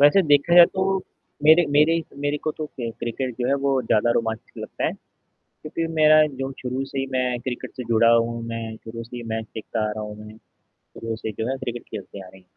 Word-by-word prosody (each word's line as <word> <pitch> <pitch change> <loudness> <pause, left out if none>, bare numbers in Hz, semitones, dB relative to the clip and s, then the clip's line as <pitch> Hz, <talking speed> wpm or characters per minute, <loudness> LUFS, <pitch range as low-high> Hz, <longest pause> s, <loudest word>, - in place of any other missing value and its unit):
वैसे 145 +7 +6
देखा 145 +1 +3
जाए 175 -1 +10
तो, 190 0 0 0.5
मेरे 160 +1 +7
मेरे, 165 +2 +4 0.2
मेरे 145 +1 0
को 155 - +1
तो 155 - -5
क 115 - -2
क्रिकेट 120 +1 -3
जो 120 - +1
है 140 - +3
वो 135 -1 +2
ज़्यादा 115 0 +2
रोमांचक 110 -1 -3
लगता - - -5
है। - - 0 0.5
क्योंकि 165 +2 -5
मेरा 155 0 +6 0.2
जो 135 0 -3
शुरू 130 +2 -2
से 135 0 -6
ही 135 - -1
मैं 125 -1 0
क्रिकेट 125 0 -5
से 125 - -5
जुड़ा 115 0 +5
हूँ, 115 0 0
मैं 115 -1 -5
शुरू 115 +1 -8
से 120 +1 -10
ही 120 - -6
मैच 110 0 -3
देखता 110 0 -4
आ - - -2
रहा 110 0 -5
हूँ 105 0 -8
मैं 110 0 -12 0.4
शुरू 115 0 -7
से 110 -1 -5
जो 110 +3 -4
है 135 - -1
क्रिकेट 120 -2 -5
खेलते 100 0 -8
आ - - -12
रहें। 95 0 -17
125 Hz, 225 wpm, -23 LUFS, 115-145 Hz, 0.5 s, जाए